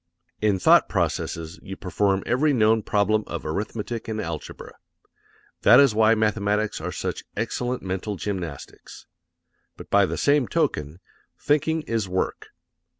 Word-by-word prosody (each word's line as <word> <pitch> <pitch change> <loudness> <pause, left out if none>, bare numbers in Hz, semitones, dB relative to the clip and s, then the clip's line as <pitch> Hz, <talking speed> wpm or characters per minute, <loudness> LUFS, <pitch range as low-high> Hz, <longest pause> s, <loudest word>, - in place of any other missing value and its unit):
In 105 -2 +2
thought - - +5
processes 85 +2 -2
you 95 -1 -8
perform 95 +1 0
every 145 +4 +2
known 110 -2 +3
problem 105 +1 +1
of 85 - -6
arithmetic 105 +7 -4
and 110 -1 -3
algebra. 80 -6 -6 0.9
That - - +7
is 140 -5 +5
why 110 +1 +4
mathematics 105 -1 0
are - - -4
such - - -4
excellent 125 0 -2
mental 95 +2 -3
gymnastics. 90 -7 -7 0.7
But - - -12
by 100 -1 +4
the - - -4
same 145 -2 +2
token, 85 - -1 0.4
thinking 155 +2 +1
is 115 -7 -2
work. 95 0 -2
105 Hz, 135 wpm, -24 LUFS, 95-115 Hz, 0.9 s, That